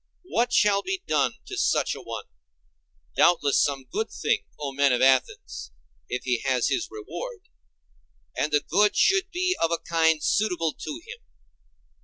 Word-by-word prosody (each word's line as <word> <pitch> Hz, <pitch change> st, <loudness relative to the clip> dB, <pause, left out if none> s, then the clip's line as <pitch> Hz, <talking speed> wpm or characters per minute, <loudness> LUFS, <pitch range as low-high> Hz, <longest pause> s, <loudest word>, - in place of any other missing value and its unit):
What 245 Hz, -9 st, 0 dB
shall 205 Hz, -4 st, +4 dB
be 380 Hz, -, -4 dB
done -, -, +1 dB
to 390 Hz, -, -7 dB
such -, -, +1 dB
a -, -, -8 dB
one? 115 Hz, -2 st, -6 dB, 0.9 s
Doubtless 150 Hz, -5 st, +4 dB
some 140 Hz, -2 st, -1 dB
good 215 Hz, -, -3 dB
thing, 150 Hz, -, 0 dB, 0.2 s
O 145 Hz, -2 st, -3 dB
men 140 Hz, 0 st, +3 dB
of 125 Hz, -, +2 dB
Athens, 130 Hz, -, +1 dB, 0.4 s
if 125 Hz, -, -3 dB
he 125 Hz, -2 st, 0 dB
has 130 Hz, -3 st, +1 dB
his 345 Hz, -, -1 dB
reward; 430 Hz, +2 st, -8 dB, 0.9 s
and 150 Hz, -, -1 dB
the 145 Hz, 0 st, +3 dB
good 205 Hz, +4 st, +3 dB
should 385 Hz, +1 st, +3 dB
be 370 Hz, 0 st, 0 dB
of 165 Hz, -, +3 dB
a 170 Hz, -, 0 dB
kind 160 Hz, -2 st, +1 dB
suitable 180 Hz, -7 st, +1 dB
to 305 Hz, +2 st, -7 dB
him. -, -, -9 dB
170 Hz, 160 wpm, -25 LUFS, -, 0.9 s, shall